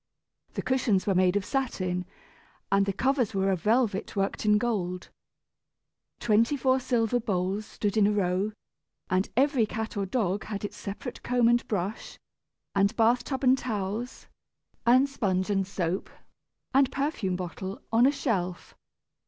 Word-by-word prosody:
The - - -2
cushions 250 -7 +1
were 200 - +2
made 185 0 +3
of 200 -2 0
satin, 185 -9 -2 0.7
and 195 0 +3
the - - +2
covers 250 +1 0
were 195 0 +2
of 185 -3 -1
velvet 220 -2 +1
worked 195 +2 -1
in 210 0 +6
gold. 190 -6 -2 1.1
Twenty 230 +5 +2
four 260 -1 +2
silver 245 -2 +1
bowls 200 -1 -1
stood 205 -1 -2
in 210 -2 +5
a - - +2
row, 195 0 0 0.6
and 185 +2 +1
every 265 -4 +3
cat 220 +1 -4
or 200 -1 -1
dog 200 -2 -1
had 205 -1 -4
its - - -6
separate 215 +5 -7
comb 245 -2 +2
and 240 0 +2
brush, 200 0 -3 0.6
and 200 +3 +2
bath 240 +2 +3
tub 270 0 -3
and 255 0 +6
towels, 220 +1 -4 0.6
and 255 +3 +6
sponge 195 -7 -1
and 195 -2 +1
soap, 185 -1 -2 0.6
and 270 -1 +4
perfume 275 - -1
bottle, 185 +2 -5
on 230 +3 +5
a - - +4
shelf. 185 - -2
210 Hz, 155 wpm, -28 LUFS, 190-245 Hz, 1.1 s, in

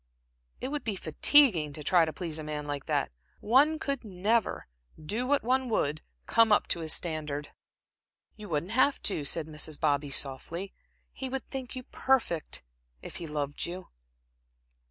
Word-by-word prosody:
It - - -3
would 295 0 -3
be 215 -3 -2
fatiguing 170 - +5
to 150 - -7
try 170 +2 +5
to 155 - -3
please 160 -2 -5
a - - -5
man 150 -1 -4
like 145 -1 -4
that. - - 0 0.3
One 280 +8 +4
could 280 -4 -3
never, 210 +2 0 0.3
do 215 +11 -3
what 285 +1 +2
one 255 +1 +1
would, 155 -8 0 0.2
come 230 -1 +4
up 210 - +5
to - - 0
his 160 -1 -2
standard." 150 -3 -2 0.9
"You 210 -3 -10
wouldn't 160 +4 -2
have 260 +4 +3
to," 165 -7 0
said 155 +3 +2
Mrs. 155 -1 -3
Bobby, 145 -2 +1
softly, 145 +8 -3 0.4
"he 265 - -3
would 265 0 -4
think 265 -2 -5
you 255 - -6
perfect, 245 - 0 0.4
if - - -7
he 170 - -6
loved 145 -1 -3
you." 180 +2 -7
175 Hz, 165 wpm, -29 LUFS, 150-250 Hz, 0.9 s, fatiguing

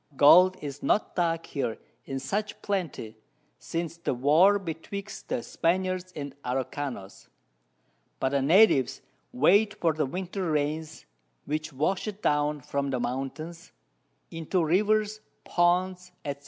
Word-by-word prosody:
Gold 180 +5 +7
is 140 -1 -6
not 215 - +1
dug 165 -2 0
here 125 -6 -3 0.3
in 135 - -4
such 205 +11 -3
Plenty, 165 - -3 0.4
since 165 0 -4
the 170 - -2
War 155 +11 +5
betwixt 195 +3 -7
the 245 -2 -1
Spaniards 185 0 -1
and 140 -2 -6
Araucanos; 130 -4 -4 0.9
but 130 - +1
the 140 0 +1
Natives 155 - +4 0.3
wait 205 +10 +4
for 165 -2 +2
the 155 -2 -1
Winter 185 +3 -3
Rains, 155 +1 -2 0.4
which 155 +1 -3
wash 155 +10 -1
it 210 0 -6
down 150 0 +1
from 140 +1 -2
the 130 -2 -1
Mountains, 145 +7 -5 0.6
into 165 +1 -1
Rivers, 210 +5 +2 0.3
Ponds, 180 +1 +1
_&c. 140 -1 -3
165 Hz, 125 wpm, -27 LUFS, 140-185 Hz, 0.9 s, Gold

